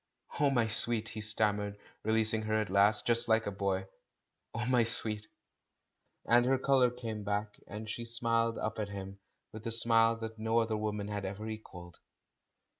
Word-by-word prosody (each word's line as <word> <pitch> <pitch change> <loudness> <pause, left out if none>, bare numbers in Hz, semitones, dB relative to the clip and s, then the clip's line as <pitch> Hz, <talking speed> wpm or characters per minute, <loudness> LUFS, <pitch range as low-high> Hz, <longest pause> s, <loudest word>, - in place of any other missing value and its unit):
"Oh, 145 -1 +4
my 120 -4 +1
sweet!" 110 0 +1
he 110 - -6
stammered, 105 -1 +1 0.2
releasing 110 0 +2
her 110 0 -1
at 110 -3 -3
last. 100 +2 +3
Just 120 0 +1
like 110 0 +2
a 100 - -2
boy 100 -1 -1
again 95 - -14 0.4
— - - -54
"Oh, 115 -1 -2
my 125 -1 +3
sweet!" 110 -2 +2 1.0
And 120 +1 +4
her 135 0 +3
colour 130 -1 +3
had 125 +1 -13
come 110 -3 -5
back, 105 +1 -3
and 110 +2 -7
she 115 +2 -5
smiled 115 0 +1
up 110 - -3
at 105 -1 -3
him, 100 -1 -8 0.3
with 110 0 -9
the 115 - -3
smile 115 0 +4
that 110 -1 -7
no 110 +1 0
other 115 -1 +1
woman 105 -1 -3
had 105 -1 -4
ever 100 +3 -5
equalled. 90 -5 -9
110 Hz, 190 wpm, -31 LUFS, 105-115 Hz, 1.0 s, Oh